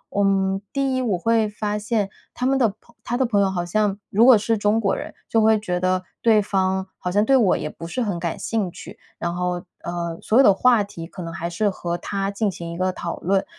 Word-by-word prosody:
嗯， 195 Hz, -1 st, +2 dB
第 275 Hz, -2 st, 0 dB
一 255 Hz, -, 0 dB
我 210 Hz, -7 st, 0 dB
会 225 Hz, +2 st, +2 dB
发 210 Hz, 0 st, -3 dB
现 210 Hz, -2 st, -1 dB, 0.2 s
他 250 Hz, -, -3 dB
们 270 Hz, +1 st, +3 dB
的 240 Hz, -4 st, +3 dB
朋 235 Hz, -, -24 dB
他 240 Hz, -, -2 dB
的 265 Hz, -, +2 dB
朋 205 Hz, -4 st, +2 dB
友 190 Hz, -1 st, +2 dB
好 175 Hz, -2 st, -2 dB
像 205 Hz, +2 st, 0 dB
如 220 Hz, +4 st, +4 dB
果 255 Hz, -3 st, +8 dB
是 220 Hz, +2 st, 0 dB
中 210 Hz, +2 st, +2 dB
国 200 Hz, -3 st, +1 dB
人， -, -, -6 dB
就 225 Hz, -, +2 dB
会 220 Hz, 0 st, +4 dB
觉 180 Hz, -4 st, -2 dB
得 185 Hz, 0 st, +1 dB, 0.2 s
对 220 Hz, -2 st, +5 dB
方 190 Hz, -1 st, 0 dB
好 180 Hz, -, -3 dB
像 205 Hz, +2 st, +3 dB
对 270 Hz, +3 st, +4 dB
我 220 Hz, -8 st, +4 dB
也 150 Hz, -, -4 dB
不 165 Hz, +2 st, -9 dB
是 250 Hz, +8 st, -3 dB
很 200 Hz, -6 st, -1 dB
感 170 Hz, -1 st, -3 dB
兴 210 Hz, -6 st, -1 dB
趣， -, -, -11 dB, 0.2 s
然 170 Hz, 0 st, -2 dB
后， 180 Hz, 0 st, -2 dB, 0.2 s
呃， 170 Hz, -1 st, -4 dB
所 225 Hz, -, +1 dB
有 270 Hz, -, +8 dB
的 200 Hz, -, +7 dB
话 235 Hz, +1 st, +4 dB
题 170 Hz, -5 st, -8 dB
可 185 Hz, -, -9 dB
能 165 Hz, -1 st, -6 dB
还 170 Hz, +1 st, -4 dB
是 205 Hz, +5 st, 0 dB
和 175 Hz, -2 st, -3 dB
他 195 Hz, +2 st, -3 dB
进 200 Hz, +1 st, 0 dB
行 170 Hz, -1 st, -7 dB
一 170 Hz, -, -6 dB
个 185 Hz, 0 st, +1 dB
讨 170 Hz, -1 st, -5 dB
论。 195 Hz, +5 st, +1 dB
200 Hz, 265 characters per minute, -22 LUFS, 180-220 Hz, 0.2 s, 果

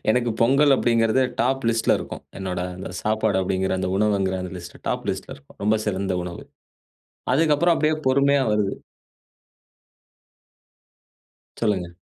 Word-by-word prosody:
எனக்கு 120 Hz, +1 st, +1 dB
பொங்கல் 135 Hz, +4 st, +5 dB
அப்டீங்குறது 115 Hz, +1 st, +2 dB, 0.2 s
டாப் 135 Hz, +1 st, 0 dB
லிஸ்ட்ல 115 Hz, -1 st, +2 dB
இருக்கும். -, -, -7 dB, 0.2 s
என்னுடைய 90 Hz, -2 st, -3 dB
அந்த 95 Hz, -, -6 dB
சாப்பாடு 110 Hz, -2 st, +1 dB
அப்டீங்குற 95 Hz, 0 st, 0 dB
அந்த 95 Hz, -, -1 dB
உணவுங்குற 100 Hz, -2 st, +1 dB
அந்த 90 Hz, -, -6 dB
லிஸ்ட் 85 Hz, 0 st, -10 dB
டாப் -, -, -2 dB
லிஸ்ட்ல -, -, -6 dB
இருக்கும். 70 Hz, 0 st, -21 dB
ரொம்ப 110 Hz, +1 st, +3 dB
சிறந்த 95 Hz, -2 st, -1 dB
உணவு. 85 Hz, -1 st, -7 dB, 0.9 s
அதுக்கப்புறம் 160 Hz, +3 st, +3 dB
அப்படியே 155 Hz, 0 st, +1 dB
பொறுமையா 140 Hz, +1 st, +3 dB
வருது. 105 Hz, -2 st, +1 dB, 2.9 s
சொல்லுங்க. 100 Hz, -6 st, 0 dB
110 Hz, 125 wpm, -23 LUFS, 95-130 Hz, 2.9 s, பொங்கல்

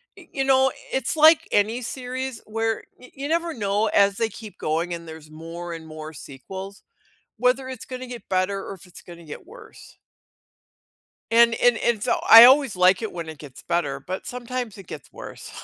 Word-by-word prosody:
you 270 Hz, -, -5 dB
know, 265 Hz, -1 st, +3 dB, 0.2 s
it's 265 Hz, +4 st, -1 dB
like 315 Hz, +1 st, +6 dB
any 220 Hz, +4 st, +1 dB
series 255 Hz, +1 st, -5 dB
where 225 Hz, +1 st, -2 dB
y 255 Hz, -, -16 dB
you 280 Hz, +1 st, -6 dB
never 335 Hz, +1 st, -1 dB
know, 205 Hz, 0 st, 0 dB
as 200 Hz, -1 st, +3 dB
they 225 Hz, -1 st, 0 dB
keep 215 Hz, 0 st, -11 dB
going 165 Hz, +3 st, -2 dB
and 170 Hz, -1 st, -8 dB
there's 160 Hz, -1 st, -11 dB
more 165 Hz, +2 st, -8 dB
and 160 Hz, -1 st, -9 dB
more 155 Hz, 0 st, -9 dB
sequels, 190 Hz, +9 st, -10 dB, 0.6 s
whether 250 Hz, +2 st, +1 dB
it's 255 Hz, -3 st, -8 dB
gonna 255 Hz, 0 st, -7 dB
get 240 Hz, -4 st, -10 dB
better 190 Hz, +1 st, 0 dB
or -, -, -7 dB
if 190 Hz, -, -17 dB
it's 180 Hz, -, -14 dB
gonna 170 Hz, -1 st, -13 dB
get 150 Hz, -, -10 dB
worse. 480 Hz, +6 st, -15 dB, 1.3 s
And 235 Hz, 0 st, +5 dB
and 245 Hz, -2 st, +3 dB
and 225 Hz, -3 st, 0 dB
so, -, -, 0 dB
I 225 Hz, +1 st, +12 dB
always 265 Hz, -5 st, +5 dB
like 185 Hz, +3 st, +4 dB
it 220 Hz, -, -3 dB
when 170 Hz, -2 st, -6 dB
it 160 Hz, -2 st, -9 dB
gets 140 Hz, -4 st, -12 dB
better, 145 Hz, -6 st, -1 dB
but 185 Hz, +7 st, -7 dB
sometimes 245 Hz, -3 st, -5 dB
it 195 Hz, -, -12 dB
gets -, -, -10 dB
worse. -, -, -10 dB
215 Hz, 190 wpm, -23 LUFS, 175-250 Hz, 1.3 s, I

